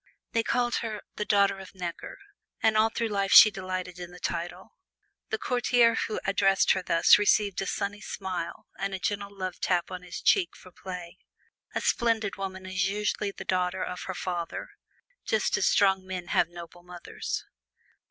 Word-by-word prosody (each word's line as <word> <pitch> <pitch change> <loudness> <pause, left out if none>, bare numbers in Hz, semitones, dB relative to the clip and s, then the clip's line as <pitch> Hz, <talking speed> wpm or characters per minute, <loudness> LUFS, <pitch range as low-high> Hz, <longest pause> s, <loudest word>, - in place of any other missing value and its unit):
They 230 - +2
called 240 +1 0
her 215 -2 -4 0.2
"The 210 - -2
Daughter 200 -1 +3
of 190 0 -12
Necker," 175 -2 -6 0.4
and 220 -1 +3
all 215 +1 +4
through 230 0 -2
life 200 -2 -1
she 215 - +10
delighted 185 -2 -5
in 175 -1 -7
the 180 0 -13
title. 175 +5 -4 0.6
The 440 - -1
courtier 245 - +3
who 220 - -2
addressed 195 0 +3
her 190 - +2
thus 170 +1 +5
received 205 -2 +2
a 195 - -3
sunny 205 +2 -3
smile 185 -5 -5
and 195 0 -2
a - - -5
gentle 200 +1 -2
love 190 -2 -6
tap 175 0 0
on 185 -1 -5
his 180 0 -7
cheek 375 -4 +2
for 185 - -15
pay. 180 -2 -8 0.6
A - - 0
splendid 225 -3 +1
woman 190 -1 -6
is 190 0 0
usually 210 0 -1
the 195 - -9
daughter 185 0 0
of 180 - -5
her 185 - -4
father, 175 -2 -4 0.5
just - - +1
as - - +2
strong 190 -2 +3
men 185 -2 -6
have 170 - +2
noble 175 0 -11
mothers. 175 0 -6
190 Hz, 175 wpm, -28 LUFS, 180-210 Hz, 0.6 s, she